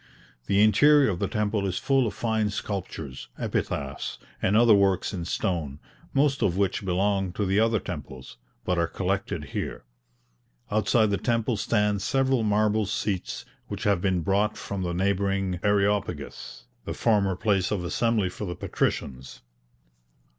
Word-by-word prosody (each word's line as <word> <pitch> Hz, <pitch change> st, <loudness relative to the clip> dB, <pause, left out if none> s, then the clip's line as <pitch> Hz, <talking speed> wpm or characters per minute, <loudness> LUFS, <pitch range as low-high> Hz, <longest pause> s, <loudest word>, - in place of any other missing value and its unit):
The 100 Hz, +1 st, +4 dB
interior 140 Hz, +4 st, +5 dB
of 90 Hz, -, -4 dB
the -, -, 0 dB
temple 105 Hz, -2 st, -1 dB
is 95 Hz, -1 st, -2 dB
full 135 Hz, -3 st, +2 dB
of -, -, -5 dB
fine 110 Hz, -2 st, 0 dB
sculptures, 95 Hz, -9 st, -5 dB
epitaphs, 70 Hz, -1 st, -3 dB, 0.2 s
and 105 Hz, +3 st, +3 dB
other 115 Hz, -1 st, +6 dB
works 100 Hz, -1 st, +2 dB
in 85 Hz, -3 st, -4 dB
stone, 80 Hz, -7 st, -2 dB, 0.3 s
most 135 Hz, 0 st, +2 dB
of 90 Hz, -2 st, +1 dB
which 100 Hz, 0 st, 0 dB
belong 95 Hz, 0 st, 0 dB
to 105 Hz, -, -1 dB
the 95 Hz, +2 st, +2 dB
other 110 Hz, 0 st, +3 dB
temples, 70 Hz, -9 st, -8 dB, 0.3 s
but 90 Hz, -1 st, +1 dB
are 85 Hz, -, +2 dB
collected 95 Hz, -3 st, -2 dB
here. -, -, -4 dB, 0.9 s
Outside 110 Hz, +1 st, +3 dB
the 100 Hz, -, +1 dB
temple 115 Hz, -1 st, 0 dB
stand 105 Hz, -1 st, +1 dB
several 135 Hz, +2 st, +1 dB
marble 105 Hz, 0 st, +2 dB
seats 100 Hz, -2 st, -3 dB, 0.2 s
which -, -, -5 dB
have 100 Hz, -4 st, +2 dB
been 95 Hz, -2 st, +1 dB
brought 100 Hz, +5 st, +1 dB
from 100 Hz, -1 st, -5 dB
the 85 Hz, -1 st, -2 dB
neighbouring 95 Hz, -1 st, 0 dB
Areopagus, 100 Hz, -10 st, -1 dB, 0.2 s
the -, -, -5 dB
former 100 Hz, -4 st, +2 dB
place 95 Hz, -2 st, +1 dB
of 100 Hz, -4 st, -1 dB
assembly 105 Hz, +2 st, +1 dB
for 105 Hz, -, -6 dB
the 90 Hz, -2 st, -4 dB
patricians. 65 Hz, -5 st, -3 dB
100 Hz, 150 wpm, -26 LUFS, 90-110 Hz, 0.9 s, other